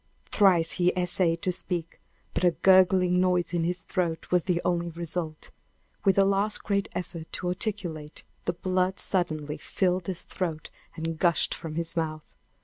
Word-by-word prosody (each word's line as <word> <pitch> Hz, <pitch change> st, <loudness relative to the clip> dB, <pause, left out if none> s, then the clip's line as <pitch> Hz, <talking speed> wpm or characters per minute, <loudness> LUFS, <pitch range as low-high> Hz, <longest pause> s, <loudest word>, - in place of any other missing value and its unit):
Thrice 180 Hz, -5 st, +3 dB
he 180 Hz, -1 st, +2 dB
essayed 180 Hz, -2 st, +1 dB
to 185 Hz, -, +1 dB
speak, 175 Hz, -2 st, -4 dB, 0.3 s
but -, -, -1 dB
a 180 Hz, -, +7 dB
gurgling 185 Hz, -1 st, +5 dB
noise 180 Hz, -1 st, +1 dB
in 170 Hz, -1 st, +1 dB
his 180 Hz, +2 st, -1 dB
throat 170 Hz, -3 st, -2 dB
was 180 Hz, -2 st, +3 dB
the 180 Hz, -2 st, +1 dB
only 170 Hz, -1 st, 0 dB
result. 165 Hz, -1 st, -4 dB, 0.5 s
With 195 Hz, 0 st, +4 dB
a 195 Hz, -, +6 dB
last 200 Hz, +2 st, +1 dB
great 200 Hz, -1 st, 0 dB
effort 170 Hz, -2 st, -6 dB
to 180 Hz, -, -2 dB
articulate, 180 Hz, -6 st, -3 dB, 0.2 s
the -, -, 0 dB
blood 185 Hz, +2 st, 0 dB
suddenly 155 Hz, -5 st, -1 dB
filled 185 Hz, -2 st, -1 dB
his 185 Hz, -2 st, -4 dB
throat 165 Hz, -4 st, -4 dB, 0.2 s
and 165 Hz, -1 st, -4 dB
gushed 170 Hz, -3 st, +3 dB
from 160 Hz, -2 st, -6 dB
his 165 Hz, 0 st, -3 dB
mouth! 155 Hz, -2 st, -3 dB
180 Hz, 160 wpm, -27 LUFS, 165-185 Hz, 0.5 s, a